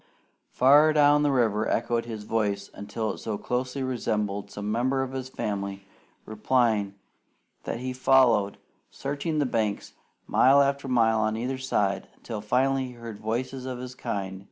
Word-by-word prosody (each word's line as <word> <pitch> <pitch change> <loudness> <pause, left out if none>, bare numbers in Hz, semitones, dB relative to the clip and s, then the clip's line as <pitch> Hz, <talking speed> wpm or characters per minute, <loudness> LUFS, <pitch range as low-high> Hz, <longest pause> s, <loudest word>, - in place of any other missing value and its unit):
Far 145 +4 +5
down 145 -1 +5
the 145 - +2
river 110 -5 +1
echoed 115 0 0
his 110 -3 -6
voice 105 -2 -1
until 105 +2 -4
it - - -10
so 110 -2 -3
closely 125 +4 -3
resembled 105 -5 -2
some 105 +1 -5
member 130 +4 +1
of 130 - -5
his 130 -1 -5
family 100 -4 -4 0.4
replying 110 -2 +1 0.7
that 115 - -4
he 130 0 -3
followed, 125 -6 +3 0.3
searching 145 +3 -3
the 145 - +2
banks 110 -5 -2 0.3
mile 135 +2 +5
after 140 0 -1
mile 115 -3 +3
on 110 0 0
either 130 +3 -3
side, 105 -7 0
until 110 -3 -7
finally 130 +5 +1
he - - -9
heard 115 -3 -9
voices 130 +4 -3
of 130 -1 -4
his 125 0 -7
kind. 95 -6 -4
120 Hz, 155 wpm, -26 LUFS, 105-130 Hz, 0.7 s, Far